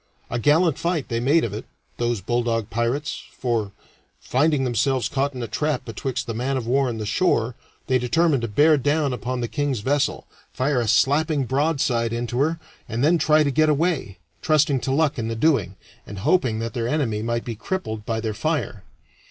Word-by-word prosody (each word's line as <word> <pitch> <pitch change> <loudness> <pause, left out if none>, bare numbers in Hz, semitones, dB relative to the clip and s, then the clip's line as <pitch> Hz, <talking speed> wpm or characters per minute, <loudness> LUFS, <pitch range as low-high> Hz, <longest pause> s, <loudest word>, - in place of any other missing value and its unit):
A 120 - -1
gallant 155 +5 +3
fight 165 -4 -1
they 115 - -1
made 145 +7 +3
of 110 - -2
it, 105 - -6 0.3
those 120 -3 -1
bulldog 115 0 -1
pirates, 120 +6 -1 0.2
for, 115 -6 -1 0.5
finding 145 +1 +1
themselves 125 +1 +1
caught 140 0 -1
in 125 - -4
a - - -3
trap 150 +5 -1
betwixt 125 +3 -4
the 115 - -4
man 130 +4 -1
of 125 - -4
war 130 +2 +2
and 115 -2 -4
the 110 - -3
shore, 115 - +1 0.3
they 130 -1 +2
determined 145 +2 +2
to 115 - -2
bear 150 +8 +4
down 145 +1 +1
upon 125 0 -3
the 120 - -1
king's 140 -4 -2
vessel, 140 +5 0 0.3
fire 130 -1 0
a 115 - -2
slapping 145 +4 +2
broadside 130 -4 0
into 120 +1 -2
her, 160 +4 +1 0.3
and 115 +3 -1
then 165 +3 +4
try 155 0 +4
to 140 - 0
get 155 +2 +3
away, 150 - 0 0.2
trusting 150 -3 +3
to 130 - -3
luck 145 -1 +1
in 110 - -2
the 115 - -3
doing, 110 - +1 0.3
and 100 - -8
hoping 130 -12 +2
that 115 +1 -4
their 115 -3 -2
enemy 120 -7 0
might 115 +1 -2
be 120 - -3
crippled 110 - -4
by 110 +1 -2
their 110 -1 -2
fire. 150 - -2
130 Hz, 195 wpm, -23 LUFS, 115-150 Hz, 0.5 s, bear